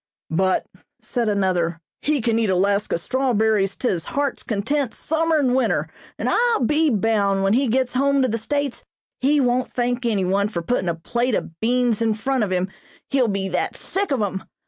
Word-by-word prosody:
"But," 185 Hz, +3 st, +1 dB, 0.3 s
said 235 Hz, -3 st, -2 dB
another, 180 Hz, -5 st, 0 dB, 0.2 s
"he 295 Hz, -2 st, +1 dB
can 225 Hz, 0 st, +1 dB
eat 220 Hz, -3 st, +1 dB
'Alaska 200 Hz, +2 st, +1 dB
strawberries' 220 Hz, -4 st, +1 dB
to 255 Hz, -, -2 dB
his 170 Hz, -3 st, -1 dB
heart's 280 Hz, -1 st, -2 dB
content, 235 Hz, +5 st, -1 dB
summer 320 Hz, 0 st, +1 dB
and 260 Hz, -4 st, +2 dB
winter, 260 Hz, -, +1 dB, 0.3 s
and -, -, -2 dB
I'll 475 Hz, -, +2 dB
be 305 Hz, +4 st, +3 dB
bound 205 Hz, -4 st, +1 dB
when 195 Hz, +1 st, +3 dB
he 265 Hz, +3 st, +2 dB
gets 250 Hz, +2 st, +1 dB
home 275 Hz, +1 st, +2 dB
to -, -, +3 dB
the 230 Hz, -1 st, -1 dB
States 285 Hz, +3 st, -2 dB, 0.4 s
he 290 Hz, +3 st, +3 dB
won't 250 Hz, -1 st, +1 dB
thank 245 Hz, 0 st, -1 dB
anyone 200 Hz, -2 st, +1 dB
for 170 Hz, -5 st, -4 dB
puttin' 185 Hz, -2 st, 0 dB
a 170 Hz, -, -1 dB
plate 240 Hz, +8 st, -1 dB
of 165 Hz, -, -5 dB
beans 240 Hz, -1 st, +1 dB
in 225 Hz, -2 st, +2 dB
front 260 Hz, +2 st, 0 dB
of 205 Hz, -, -1 dB
him, 185 Hz, 0 st, 0 dB, 0.4 s
he'll 265 Hz, -3 st, +3 dB
be 195 Hz, -2 st, -1 dB
that 180 Hz, -, -1 dB
sick 395 Hz, 0 st, -2 dB
of 265 Hz, -7 st, +1 dB
'em! 190 Hz, -1 st, -3 dB
230 Hz, 190 wpm, -22 LUFS, 195-265 Hz, 0.4 s, be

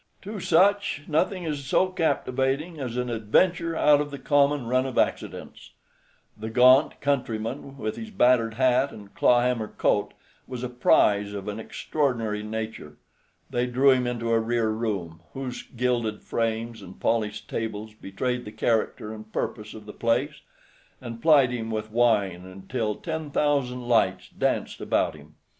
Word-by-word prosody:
To 205 Hz, +1 st, -6 dB
such 185 Hz, -5 st, +2 dB
nothing 180 Hz, +4 st, 0 dB
is 150 Hz, -4 st, -3 dB
so 185 Hz, +7 st, +2 dB
captivating 150 Hz, -2 st, -1 dB
as 125 Hz, -3 st, -4 dB
an 125 Hz, 0 st, -1 dB
adventure 165 Hz, -, +1 dB
out 150 Hz, -2 st, +5 dB
of 145 Hz, -, -3 dB
the 140 Hz, -, -7 dB
common 140 Hz, 0 st, +2 dB
run 130 Hz, +2 st, +1 dB
of 130 Hz, -, -6 dB
accidents. -, -, -2 dB, 0.6 s
The 110 Hz, +1 st, -6 dB
gaunt 130 Hz, +5 st, +5 dB
countryman, 135 Hz, 0 st, -2 dB
with 110 Hz, -5 st, -4 dB
his 225 Hz, -, -7 dB
battered 125 Hz, -, +3 dB
hat 130 Hz, +2 st, +3 dB
and 100 Hz, -2 st, -12 dB
clawhammer 120 Hz, -2 st, +2 dB
coat, -, -, 0 dB, 0.3 s
was 125 Hz, -1 st, -6 dB
a 125 Hz, -, -2 dB
prize 105 Hz, -4 st, +3 dB
of 100 Hz, 0 st, -6 dB
an 105 Hz, +1 st, -4 dB
extraordinary 115 Hz, -4 st, -2 dB
nature. 110 Hz, -8 st, -6 dB, 0.5 s
They 120 Hz, +1 st, 0 dB
drew 130 Hz, +3 st, +4 dB
him 125 Hz, -1 st, +2 dB
into 115 Hz, -1 st, -2 dB
a 115 Hz, -, +4 dB
rear 115 Hz, 0 st, 0 dB
room, 100 Hz, -8 st, -3 dB
whose 130 Hz, -2 st, -5 dB
gilded 120 Hz, -3 st, -2 dB
frames 115 Hz, 0 st, -2 dB
and 95 Hz, -1 st, -12 dB
polished 105 Hz, -2 st, -1 dB
tables 110 Hz, -1 st, -4 dB
betrayed 120 Hz, +5 st, -3 dB
the 105 Hz, -, -7 dB
character 110 Hz, -1 st, -1 dB
and 110 Hz, 0 st, -11 dB
purpose 105 Hz, -1 st, -4 dB
of 110 Hz, -1 st, -11 dB
the 105 Hz, -, -9 dB
place, 130 Hz, +6 st, 0 dB, 0.6 s
and 115 Hz, -2 st, -8 dB
plied 145 Hz, -6 st, +5 dB
him 115 Hz, -2 st, -4 dB
with 110 Hz, -1 st, -4 dB
wine 105 Hz, -6 st, +2 dB
until 100 Hz, +4 st, -4 dB
ten 160 Hz, -2 st, -5 dB
thousand 140 Hz, -4 st, 0 dB
lights 110 Hz, -6 st, +2 dB
danced -, -, -2 dB
about -, -, +1 dB
him. 75 Hz, 0 st, -16 dB
120 Hz, 155 wpm, -26 LUFS, 110-140 Hz, 0.6 s, out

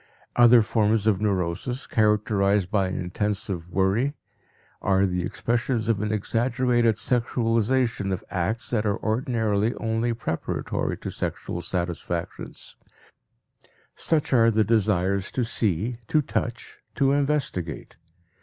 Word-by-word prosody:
Other 120 Hz, -1 st, +7 dB
forms 110 Hz, -1 st, +1 dB
of 105 Hz, -3 st, +2 dB
neurosis, 100 Hz, +5 st, -1 dB
characterized 105 Hz, -3 st, +2 dB
by 100 Hz, -3 st, +2 dB
intensive 95 Hz, -1 st, -3 dB
worry, 100 Hz, +10 st, +1 dB, 0.7 s
are 95 Hz, 0 st, +3 dB
the 90 Hz, -1 st, -1 dB
expression 115 Hz, +6 st, -1 dB
of 110 Hz, -2 st, 0 dB
an 105 Hz, 0 st, -1 dB
exaggerated 120 Hz, +2 st, +1 dB
sexualization 115 Hz, -2 st, 0 dB
of 95 Hz, -, -3 dB
acts 100 Hz, +5 st, -2 dB
that 110 Hz, -3 st, +1 dB
are 105 Hz, -1 st, 0 dB
ordinarily 110 Hz, -2 st, 0 dB
only 115 Hz, +1 st, -1 dB
preparatory 80 Hz, -8 st, -3 dB
to -, -, -6 dB
sexual 85 Hz, -, -4 dB
satisfactions; 85 Hz, -2 st, -4 dB, 1.2 s
such 155 Hz, -4 st, 0 dB
are 115 Hz, -2 st, +6 dB
the 110 Hz, -1 st, +3 dB
desires 100 Hz, -3 st, +1 dB
to 125 Hz, -, 0 dB
see, 110 Hz, +1 st, -1 dB
to 155 Hz, -1 st, +2 dB
touch, 120 Hz, -3 st, -4 dB, 0.2 s
to 135 Hz, -2 st, +3 dB
investigate. 140 Hz, -, -1 dB
110 Hz, 115 wpm, -25 LUFS, 95-120 Hz, 1.2 s, Other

